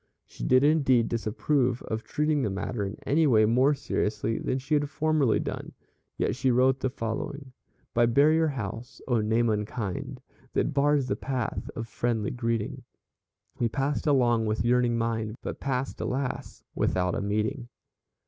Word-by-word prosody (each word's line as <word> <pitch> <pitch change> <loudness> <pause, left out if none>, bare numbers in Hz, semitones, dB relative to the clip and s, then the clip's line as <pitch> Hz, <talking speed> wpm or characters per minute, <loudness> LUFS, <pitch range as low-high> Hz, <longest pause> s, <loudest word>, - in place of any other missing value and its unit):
She - - -10
did 130 +1 +4
indeed 140 -6 +3
disapprove 125 +3 0
of 110 0 -3
treating 150 -1 0
the 110 - 0
matter 100 +3 -3
in 100 +2 -4
any 155 +3 +3
way 110 -5 +5
more 130 +6 +3
seriously 110 -3 -1
than 130 - -1
she 135 +4 -4
had 145 -1 +2
formerly 155 -6 +2
done, - - -5 0.4
yet - - 0
she 130 - +1
wrote 130 +2 +3
the 130 - 0
following: 130 +3 -5 0.4
"By 120 0 +4
Barrier 155 +6 +4
House 125 -2 -5
oh, 120 -4 +2
name 110 +2 +2
unkind, 105 -2 -3 0.3
That - - 0
bars 145 0 +3
the - - -1
path 130 -4 -3
of 115 0 -4
friendly 115 -3 -1
greeting; 115 -3 -2 0.8
We 120 - +2
passed 140 +5 -1
along 120 -5 +3
with 110 0 -1
yearning 120 -1 +3
mind, 115 -1 -1
But - - -5
passed, 135 -1 -2
alas! 130 0 -3
without 90 -1 0
a - - -1
meeting." 110 +5 -2
125 Hz, 160 wpm, -27 LUFS, 110-140 Hz, 0.8 s, way